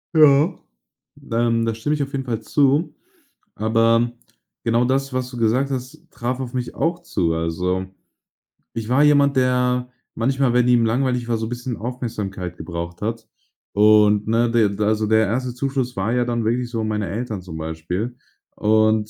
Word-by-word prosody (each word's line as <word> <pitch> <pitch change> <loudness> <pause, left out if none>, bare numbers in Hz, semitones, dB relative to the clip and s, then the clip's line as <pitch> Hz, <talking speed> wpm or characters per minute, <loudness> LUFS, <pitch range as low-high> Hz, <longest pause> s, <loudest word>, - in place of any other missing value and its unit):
Ja, 155 +2 +6 0.8
ähm, 115 0 +1
da 115 - 0
stimme 120 +7 -1
ich 150 - -1
auf 140 - -7
jeden 135 -1 -3
Fall 115 -3 -3
zu. 145 +7 +2 0.6
Aber 115 +2 +2 0.5
genau 115 +1 +2
das, 135 +2 0
was 130 -1 -2
du 125 - -8
gesagt 120 +5 +1
hast, 130 -1 -5
traf 125 +2 -3
auf 125 -2 -5
mich 125 -1 -4
auch 170 +1 0
zu, 85 - -1
also, 90 +3 -1 0.9
ich 115 -1 -5
war 130 +4 +4
jemand, 140 -2 +4
der 125 -1 +1 0.3
manchmal, 130 +1 +1
wenn 125 0 +3
ihm 120 -2 +4
langweilig 125 +1 0
war, 115 - +1
so 110 0 -3
bisschen 120 0 -4
Aufmerksamkeit 110 -6 -5
gebraucht 85 0 -6
hat. 115 +1 -3 0.5
Und, 105 0 +5
ne, 115 +1 +2
de 115 -3 +3
d 105 - -1
also, 110 0 +1
der 110 0 +3
1. 125 +4 -2
Zuschuss 130 -1 -2
war 95 +4 -1
ja 125 -1 +1
dann 120 -1 -1
wirklich 120 +2 0
so 115 -2 -2
meine 105 -2 -2
Eltern 110 -1 -4
zum 90 -3 -8
Beispiel 80 +9 -4 0.4
und 110 0 +2
115 Hz, 170 wpm, -21 LUFS, 110-125 Hz, 0.9 s, Ja